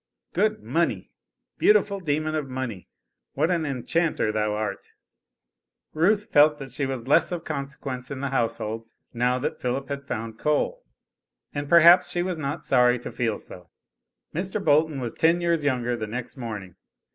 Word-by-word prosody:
Good 215 +3 +1
Money! 170 +1 -1 0.5
beautiful 205 -1 +4
demon 155 -2 -1
of 150 -3 -2
Money, 130 -7 -5 0.5
what 155 +5 +1
an 165 -3 0
enchanter 140 -1 0
thou 105 0 0
art! 105 -2 -4 1.0
Ruth 205 +6 +2
felt 150 +1 +6
that 135 -3 -8
she 135 +2 -2
was 130 -3 -4
of - - -16
less 165 +5 +4
consequence 140 -3 -5
in 140 -2 -5
the 140 0 -2
household, 115 -2 -2 0.2
now 125 +1 +1
that 150 +4 -3
Philip 130 +2 -2
had 140 0 -5
found 110 0 -5
Coal, 325 - 0 0.7
and 145 0 -4
perhaps 170 +2 +7
she 175 - 0
was 180 -3 -3
not 145 +2 -4
sorry 125 -1 +4
to 120 - -7
feel 115 -3 -1
so. 90 -1 -12 0.6
Mr. 190 +5 -1
Bolton 155 -1 +3
was 120 -3 -4
ten 165 +2 +3
years 170 -3 +1
younger 125 -4 0
the 110 -2 -4
next 120 +3 -5
morning. 105 -8 -7
140 Hz, 160 wpm, -25 LUFS, 120-165 Hz, 1.0 s, perhaps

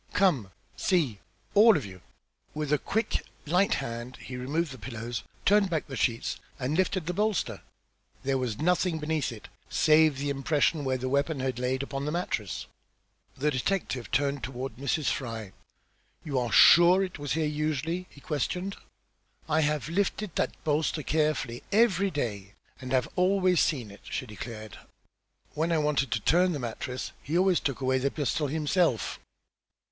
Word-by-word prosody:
Come 150 - +2 0.3
see, 145 - +1 0.3
all 215 -1 +7
of 140 - -4
you." 95 -2 -10 0.5
With 150 -1 -1
a 150 - +3
quick 220 +1 -1 0.2
light 180 +6 +3
hand 120 +2 -5
he 130 - -8
removed 145 +5 -1
the 130 - -9
pillows, 115 +1 -5 0.2
turned 205 -1 +4
back 160 -3 -1
the 135 - -7
sheets 115 -2 -1 0.2
and 135 +4 -1
lifted 185 -1 +1
the 180 - -2
bolster. 210 -1 0 0.6
There 135 0 +1
was 120 -5 -2
nothing 180 +1 +1
beneath 155 -3 -1
it, 110 -3 -10 0.2
save 155 -2 +4
the 140 +1 -1
impression 145 +2 +1
where 130 -1 +1
the 130 +1 -3
weapon 140 +2 0
had 130 -2 -2
laid 130 +2 0
upon 140 0 -4
the 150 - -1
mattress. 105 - -2 0.7
The 150 +3 +1
detective 130 -3 -1
turned 140 0 0
toward 130 -2 -5
Mrs. 140 +3 0
Fry. 115 -6 -4 0.7
"You 140 -4 -1
are 120 -2 -2
sure 175 +3 +8
it 185 -5 -5
was 145 -1 -2
here 160 +1 +1
usually?" 155 +4 -2
he 140 - -16
questioned. 180 +7 -2 0.7
"I 160 0 +2
have 150 -1 0
lifted 195 +2 -1
that - - 0
bolster 155 0 0
carefully 150 -6 0
every 200 -3 +4
day, 105 - -4 0.3
and 130 -1 -6
have 130 -1 +2
always 185 -1 +3
seen 125 -9 0
it," 100 - -14
she - - -3
declared. 110 0 -8 0.7
"When 160 +3 0
I 165 - +3
wanted 150 -3 +1
to 120 - 0
turn 180 - +3
the - - -2
mattress 125 +1 -4
he 155 +5 -1
always 185 -1 +4
took 140 -1 -2
away 130 0 +2
the 140 +2 +1
pistol 145 +1 -1
himself." 155 - +1
145 Hz, 165 wpm, -28 LUFS, 130-170 Hz, 0.7 s, sure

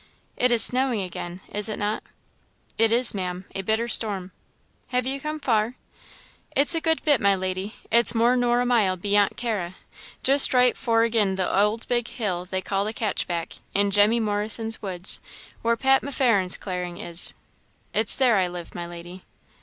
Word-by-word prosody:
It 250 - +2
is 235 -2 +6
snowing 255 -3 +3
again, 180 0 -7
is 210 +1 +1
it 215 - -4
not?" 210 +1 -2 0.7
"It 225 0 +2
is, 240 +1 +4
Maam 180 -2 -5
a 195 - -4
bitter 220 +4 -1
storm." 200 -5 +1 0.6
"Have 250 -1 -1
you 270 +1 -3
come 305 +1 -5
far?" 230 -3 0 0.8
"It's 290 +5 +5
a 330 - 0
good 320 -1 +1
bit, 290 -5 +3
my 200 -1 +3
lady 185 +3 -4 0.2
it's 235 +1 +3
more 235 +2 +3
nor 245 -1 +1
a - - -1
mile 215 -7 +1
beyant 205 +2 +1
Carra 205 -7 -3 0.5
just 275 0 +6
right 250 0 +4
forgin 225 -4 +1
the 190 -1 -1
ould 210 +3 0
big 240 -1 0
hill 185 -6 -4
they 185 0 -4
call 195 0 -1
the 215 +2 -4
Catchback; 180 -6 -3 0.2
in 200 0 +2
Jemmy 210 +4 +3
Morrison's 220 +1 0
woods 185 -2 -2 0.4
where 230 0 0
Pat 265 +2 +3
M'Farren's 230 -9 0
clearing 180 -2 -6
is 170 0 +2 0.6
it's 215 0 +4
there 250 -5 +3
I 185 -2 +1
live, 175 -1 -9
my 175 0 -6
lady." 175 +2 -11
215 Hz, 170 wpm, -24 LUFS, 190-240 Hz, 0.8 s, is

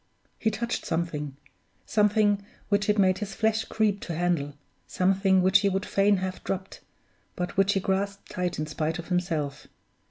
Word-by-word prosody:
He 220 - +2
touched 235 +3 -3
something! 150 -4 -3 0.5
Something 210 -1 +3 0.3
which 205 0 +1
it 210 - +3
made 185 -2 +3
his 205 -1 -5
flesh 220 0 +1
creep 210 -2 +1
to 170 - -5
handle; 160 -5 0 0.3
something 190 0 +3
which 190 +2 +6
he 200 -1 +2
would 195 +1 -1
fain 200 0 +3
have 185 0 -4
dropped, 190 0 -4 0.6
but 180 0 -3
which 195 +1 +3
he 195 - +1
grasped 195 +1 -2
tight 180 -1 -2
in 155 - -1
spite 155 +2 -2
of 170 0 -8
himself. 160 -6 -2
190 Hz, 165 wpm, -27 LUFS, 175-205 Hz, 0.6 s, which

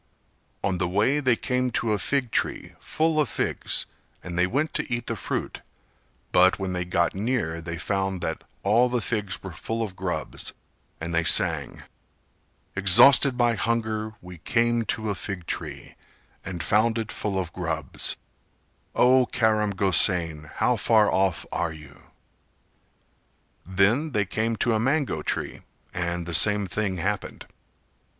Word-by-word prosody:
On 95 -2 0
the 90 - +1
way 105 +11 +2
they 130 -4 +3
came 125 +2 -1
to 110 -2 0
a 105 - -1
fig 135 -5 -1
tree - - -2
full 160 0 0
of 150 - +2
figs - - -2 0.4
and 90 -1 -6
they 90 +1 +3
went 145 +9 -1
to - - -3
eat 120 -1 -2
the - - -2
fruit; - - -4 0.7
but 95 +1 +5
when 95 -2 -3
they 90 0 -2
got 85 -1 +1
near 100 -6 -2
they 85 0 -5
found 95 +1 -1
that 80 - -3 0.2
all 115 +5 +4
the 125 0 0
figs 105 -6 -3
were 95 - -6
full 115 +7 -3
of 100 -4 -6
grubs, 90 -5 -4 0.5
and 80 +1 -5
they 85 0 +2
sang: 85 - +2 0.9
"Exhausted 120 +7 +6
by 120 -1 +3
hunger 110 0 -1
we 90 -2 -11
came 120 +4 +1
to 110 -2 -2
a - - 0
fig 95 -1 -5
tree, - - -6 0.5
And 90 -2 -5
found 110 +2 +2
it 110 -2 -3
full 100 -2 -2
of 90 -3 -3
grubs, - - -3 0.8
O 125 0 +5
Karam 110 -2 +1
Gosain, 90 -5 +2
how - - +2
far 110 -2 +4
off 95 -2 +1
are 80 - -1
you?" 75 -1 -14 1.7
Then 105 +11 +2
they 105 -3 +1
came 110 +3 -1
to 115 +1 +1
a 110 - +1
mango 135 +5 0
tree - - -3 0.3
and 85 -1 -2
the 85 - -5
same 105 +4 +5
thing 95 +1 -2
happened. 95 +3 -3
105 Hz, 155 wpm, -25 LUFS, 90-115 Hz, 1.7 s, Exhausted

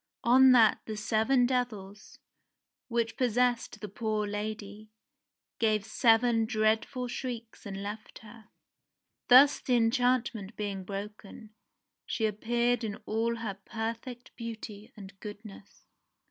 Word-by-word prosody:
On 260 +2 +7
that 225 -3 +5
the 215 -1 -4
seven 225 +4 +2
devils, 215 -5 -3 0.7
which 230 -1 -1
possessed 245 -1 0
the 210 - -5
poor 215 +1 -2
lady, 210 0 -6 0.7
gave 215 -3 +1
seven 225 0 +3
dreadful 220 +3 0
shrieks 235 -3 -6
and 195 0 -6
left 210 +2 -7
her. 220 0 -14 0.8
Thus 270 +3 +7
the 250 - 0
enchantment 235 -3 +1
being 200 -2 -4
broken, 210 +2 -8 0.6
she 225 - -1
appeared 235 +3 0
in 210 -2 -3
all 230 +2 0
her 215 -4 -5
perfect 230 +3 -6
beauty 225 -1 -8
and 195 -1 -10
goodness. 205 -1 -11
225 Hz, 115 wpm, -29 LUFS, 210-240 Hz, 0.8 s, On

